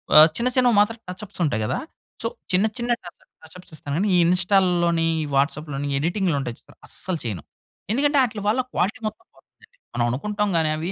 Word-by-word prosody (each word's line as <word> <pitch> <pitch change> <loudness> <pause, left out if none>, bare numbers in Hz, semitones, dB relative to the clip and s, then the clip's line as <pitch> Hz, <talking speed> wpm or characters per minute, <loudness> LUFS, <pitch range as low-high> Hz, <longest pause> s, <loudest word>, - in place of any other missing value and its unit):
ఆహ్, 155 +1 +10
చిన్న 235 +2 +1
చిన్నవి 250 -3 +4
మాత్రం 210 +3 +2
టచ్ 180 +3 -7
అప్స్ 200 -1 -13
ఉంటాయి 120 -8 0
కదా! - - -1 0.4
సో - - 0 0.2
చిన్న, 185 +3 +4
చిన్న 240 0 -3
టచ్ 175 - -8
అప్, - - -35 0.2
టచ్ 160 - -15
అప్స్ 180 +1 -14
ఇస్తా 145 - -9
కానీ, 195 +6 +1
ఈ - - +5
ఇన్‌స్టాల్‍ 185 +1 +3
లోని, 170 -1 +2 0.2
ఈ - - -2
వాట్సాప్‍ 150 +3 0
లోని, 140 +1 -3
ఎడిటింగ్‌లు 175 +2 0
ఉంటాయి 125 -4 -4
చూసారా, - - -22
అస్సలు 185 -4 +1
చేయను. 100 -10 -4 0.5
ఎందుకంటే 285 +4 +2
ఆటిలవళ్ళ 220 0 0
క్వాలిటీ 205 +6 0
మొత్తం 215 - -8
పోతుందండి. - - -25 0.2
మనం 120 - +1
అనుకుంటాం 210 - -1
కానీ 160 -1 +2
అవి 165 +4 -3
180 Hz, 205 wpm, -23 LUFS, 155-210 Hz, 0.5 s, ఆహ్